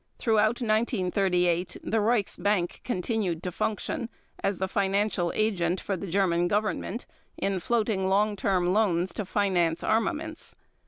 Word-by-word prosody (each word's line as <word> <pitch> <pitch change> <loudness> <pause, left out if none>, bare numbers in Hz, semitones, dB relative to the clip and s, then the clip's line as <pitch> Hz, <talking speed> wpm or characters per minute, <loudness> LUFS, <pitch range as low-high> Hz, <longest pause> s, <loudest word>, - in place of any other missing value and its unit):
Throughout 220 +1 +2
1938 185 -5 +1
the 225 - 0
Reichsbank 205 -4 0
continued 185 -5 -1
to 180 - -3
function, 230 - -2 0.3
as 195 -1 0
the 190 - -1
financial 195 -2 0
agent 185 -5 +1
for 195 - -2
the 195 +2 -6
German 175 -1 +2
Government 210 +3 -1 0.3
in 195 -1 -1
floating 210 -2 0
long 205 +2 +2
term 185 -2 +1
loans 185 -4 +2
to 210 - -3
finance 180 -5 +1
armaments. 315 +8 -1
200 Hz, 125 wpm, -27 LUFS, 180-220 Hz, 0.3 s, Throughout